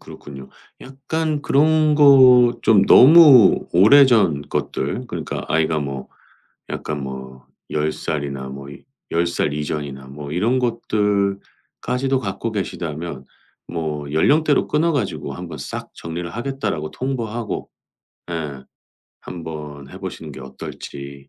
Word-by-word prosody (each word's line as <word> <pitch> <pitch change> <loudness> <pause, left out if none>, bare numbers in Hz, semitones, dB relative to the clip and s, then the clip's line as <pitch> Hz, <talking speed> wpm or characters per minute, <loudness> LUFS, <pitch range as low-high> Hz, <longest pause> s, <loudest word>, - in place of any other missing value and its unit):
그렇군요. 70 -2 -11 0.3
약간 145 +3 -3
그런 155 +2 +3
거 140 -3 +7 0.3
좀 100 -3 +4
너무 140 - +7
오래전 105 - +5
것들 100 - -3
그러니까 85 -7 -5
아이가 80 -1 +1
뭐 70 -2 -5 0.6
약간 75 -2 -4
뭐 65 -1 -9 0.2
10 75 0 0
살이나 70 -4 -4
뭐 70 +1 -9
이 70 - -13 0.3
10 85 +1 +1
살 80 -4 -1
이전이나 75 -3 -5
뭐 70 +1 -9
이런 110 +10 +1
것들까지도 110 +4 -2
갖고 110 0 -4
계시다면 85 -7 -5 0.4
뭐 75 -4 -5
연령대로 145 - +2
끊어 160 +3 +1
가지고 145 -4 -3
한번 85 -4 -8
싹 - - -7
정리를 85 +1 -6
하겠다라고 110 - -4
통보하고 120 -4 -4 0.6
예 75 -5 -5 0.6
한번 75 -5 -8
해 95 - -10
보시는 85 -5 -8
게 65 - -10
어떨지. 70 +1 -9
85 Hz, 250 characters per minute, -20 LUFS, -, 0.6 s, 거